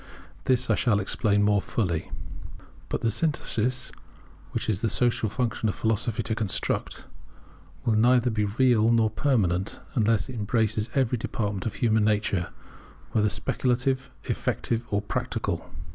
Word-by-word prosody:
This 125 Hz, -1 st, +2 dB
I -, -, +3 dB
shall 105 Hz, -4 st, +2 dB
explain 105 Hz, +1 st, +1 dB
more 100 Hz, -1 st, +3 dB
fully. 85 Hz, -9 st, -2 dB, 0.8 s
But -, -, -2 dB
the 115 Hz, -, +1 dB
synthesis, 130 Hz, -3 st, 0 dB, 0.6 s
which -, -, -3 dB
it -, -, +3 dB
is 100 Hz, -1 st, -2 dB
the 115 Hz, -, +1 dB
social 115 Hz, -1 st, +2 dB
function 115 Hz, -1 st, -1 dB
of -, -, -3 dB
Philosophy 110 Hz, 0 st, 0 dB
to -, -, -1 dB
construct, 110 Hz, -4 st, -1 dB, 0.8 s
will 115 Hz, -, +3 dB
neither 120 Hz, +2 st, +4 dB
be 105 Hz, -1 st, 0 dB
real 115 Hz, +1 st, +3 dB
nor 115 Hz, -2 st, +3 dB
permanent, 100 Hz, -8 st, 0 dB
unless 115 Hz, -2 st, +2 dB
it 130 Hz, -, -7 dB
embraces 110 Hz, 0 st, 0 dB
every 125 Hz, -3 st, +1 dB
department 105 Hz, -3 st, -2 dB
of 105 Hz, -, -4 dB
human 110 Hz, -3 st, +2 dB
nature, 105 Hz, -4 st, +1 dB, 0.6 s
whether 105 Hz, +3 st, +2 dB
speculative, 130 Hz, +4 st, 0 dB, 0.2 s
effective, 115 Hz, 0 st, -2 dB
or 100 Hz, 0 st, 0 dB
practical. -, -, -3 dB
110 Hz, 145 wpm, -26 LUFS, 105-120 Hz, 0.8 s, neither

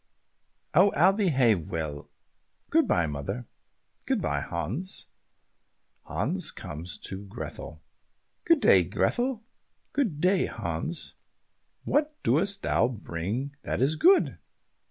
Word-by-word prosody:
"Oh, 185 Hz, +5 st, +6 dB
I'll 180 Hz, +6 st, +6 dB
behave 130 Hz, -, +2 dB
well. 75 Hz, -3 st, -4 dB, 0.6 s
Good -, -, +4 dB
bye, 85 Hz, -, +3 dB
mother." 75 Hz, -, -4 dB, 0.6 s
"Good -, -, +1 dB
bye, -, -, 0 dB
Hans." 105 Hz, -, -4 dB, 1.0 s
Hans -, -, -1 dB
comes 80 Hz, +2 st, -7 dB
to 95 Hz, +1 st, -7 dB
Grethel, 110 Hz, +5 st, -7 dB, 0.6 s
"Good 335 Hz, -3 st, +4 dB
day, -, -, +6 dB
Grethel." 245 Hz, -2 st, 0 dB, 0.5 s
"Good 220 Hz, -, 0 dB
day, 185 Hz, +3 st, +3 dB
Hans. 85 Hz, -, -4 dB, 0.7 s
What 300 Hz, +1 st, +1 dB
dost 195 Hz, +11 st, +1 dB
thou 115 Hz, -, +3 dB
bring 110 Hz, +4 st, -4 dB
that -, -, -2 dB
is 135 Hz, +5 st, +2 dB
good?" 370 Hz, -, +4 dB
135 Hz, 110 wpm, -28 LUFS, -, 1.0 s, Oh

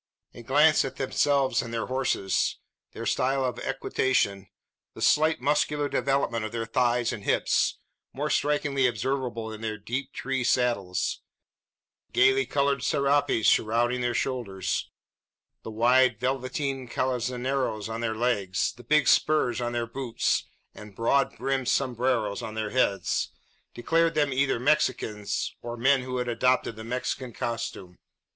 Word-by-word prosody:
A -, -, -10 dB
glance 150 Hz, +6 st, +4 dB
at 135 Hz, -1 st, -5 dB
themselves 135 Hz, 0 st, +1 dB
and 115 Hz, -, -7 dB
their 115 Hz, -1 st, -2 dB
horses, 130 Hz, -7 st, 0 dB, 0.4 s
their -, -, -6 dB
style 135 Hz, +1 st, +1 dB
of 125 Hz, -, -3 dB
equitation, 130 Hz, -7 st, 0 dB, 0.5 s
the -, -, -10 dB
slight 155 Hz, +1 st, +3 dB
muscular 145 Hz, +1 st, +1 dB
development 130 Hz, -4 st, 0 dB
of 110 Hz, -, -4 dB
their 115 Hz, -1 st, -3 dB
thighs 120 Hz, 0 st, +1 dB
and 100 Hz, -, -7 dB
hips -, -, +1 dB, 0.3 s
more 145 Hz, +2 st, -3 dB
strikingly 145 Hz, -2 st, +1 dB
observable 120 Hz, -1 st, -2 dB
in 110 Hz, -, -9 dB
their 110 Hz, -1 st, -3 dB
deep 125 Hz, +6 st, -4 dB
tree 135 Hz, -2 st, -2 dB
saddles 115 Hz, -8 st, 0 dB, 0.9 s
the -, -, -42 dB
gaily 130 Hz, +1 st, +4 dB
coloured 140 Hz, -1 st, +1 dB
serapes 140 Hz, -4 st, +1 dB
shrouding 120 Hz, +3 st, +2 dB
their 120 Hz, 0 st, -1 dB
shoulders, 115 Hz, -8 st, -2 dB, 0.7 s
the -, -, -8 dB
wide 125 Hz, +4 st, +3 dB
velveteen 130 Hz, +1 st, -2 dB
calzoneros 125 Hz, -2 st, -1 dB
on 115 Hz, +1 st, -4 dB
their 110 Hz, -1 st, -1 dB
legs, 105 Hz, -6 st, 0 dB
the 120 Hz, 0 st, -15 dB
big 150 Hz, +3 st, +3 dB
spurs 125 Hz, -6 st, +3 dB
on 120 Hz, 0 st, -2 dB
their 120 Hz, -1 st, -1 dB
boots, 120 Hz, 0 st, -1 dB, 0.3 s
and 105 Hz, -2 st, -12 dB
broad 135 Hz, +5 st, +1 dB
brimmed 135 Hz, -2 st, -1 dB
sombreros 120 Hz, -5 st, 0 dB
on 110 Hz, -, -6 dB
their 110 Hz, -1 st, -3 dB
heads, 115 Hz, -6 st, +1 dB, 0.5 s
declared 165 Hz, +7 st, +1 dB
them 145 Hz, -3 st, +2 dB
either 135 Hz, -2 st, +1 dB
Mexicans, 120 Hz, -7 st, 0 dB
or 120 Hz, 0 st, -6 dB
men 130 Hz, +3 st, +3 dB
who 125 Hz, 0 st, -4 dB
had 125 Hz, 0 st, -2 dB
adopted 125 Hz, -1 st, +1 dB
the 110 Hz, -, -9 dB
Mexican 125 Hz, +1 st, -3 dB
costume. 100 Hz, -7 st, -5 dB
125 Hz, 140 wpm, -27 LUFS, 115-135 Hz, 0.9 s, glance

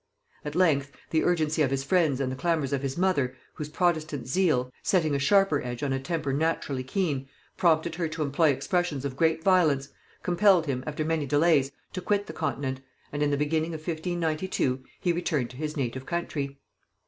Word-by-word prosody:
At 150 Hz, 0 st, -5 dB
length, 145 Hz, -6 st, +2 dB, 0.2 s
the 160 Hz, -, +2 dB
urgency 160 Hz, -3 st, +1 dB
of 140 Hz, -, +3 dB
his 135 Hz, 0 st, -1 dB
friends 155 Hz, -3 st, +2 dB
and 130 Hz, -2 st, -1 dB
the -, -, -3 dB
clamors 145 Hz, -1 st, 0 dB
of 135 Hz, -, 0 dB
his 135 Hz, +1 st, -3 dB
mother, 145 Hz, -9 st, +1 dB, 0.2 s
whose 150 Hz, -1 st, -6 dB
protestant 155 Hz, -5 st, 0 dB
zeal, 130 Hz, -6 st, +1 dB
setting 160 Hz, -6 st, +2 dB
a 140 Hz, -, +1 dB
sharper 160 Hz, +2 st, +3 dB
edge 120 Hz, +1 st, -5 dB
on 135 Hz, -2 st, 0 dB
a 135 Hz, -, 0 dB
temper 145 Hz, 0 st, -2 dB
naturally 145 Hz, -3 st, -1 dB
keen, 140 Hz, -2 st, -1 dB, 0.3 s
prompted 165 Hz, -1 st, +2 dB
her 170 Hz, 0 st, -1 dB
to 160 Hz, 0 st, -3 dB
employ 150 Hz, +3 st, +3 dB
expressions 150 Hz, 0 st, 0 dB
of 135 Hz, -2 st, -3 dB
great 160 Hz, +2 st, +2 dB
violence, 155 Hz, -8 st, +3 dB, 0.3 s
compelled 180 Hz, -1 st, +4 dB
him, 130 Hz, -3 st, -2 dB
after 150 Hz, +1 st, -2 dB
many 160 Hz, -2 st, 0 dB
delays, 145 Hz, -1 st, +3 dB, 0.2 s
to 185 Hz, -, -4 dB
quit 205 Hz, +2 st, 0 dB
the 160 Hz, -, -8 dB
continent; 135 Hz, -4 st, -2 dB, 0.3 s
and 145 Hz, -, -2 dB
in 150 Hz, -, +3 dB
the 145 Hz, -, +1 dB
beginning 160 Hz, +3 st, 0 dB
of 155 Hz, 0 st, -10 dB
1592 160 Hz, -5 st, -1 dB, 0.2 s
he 175 Hz, -, +1 dB
returned 155 Hz, -8 st, -1 dB
to 125 Hz, -, -12 dB
his 150 Hz, +1 st, -4 dB
native 130 Hz, 0 st, -3 dB
country. 145 Hz, -5 st, -3 dB
155 Hz, 190 wpm, -27 LUFS, 135-170 Hz, 0.3 s, compelled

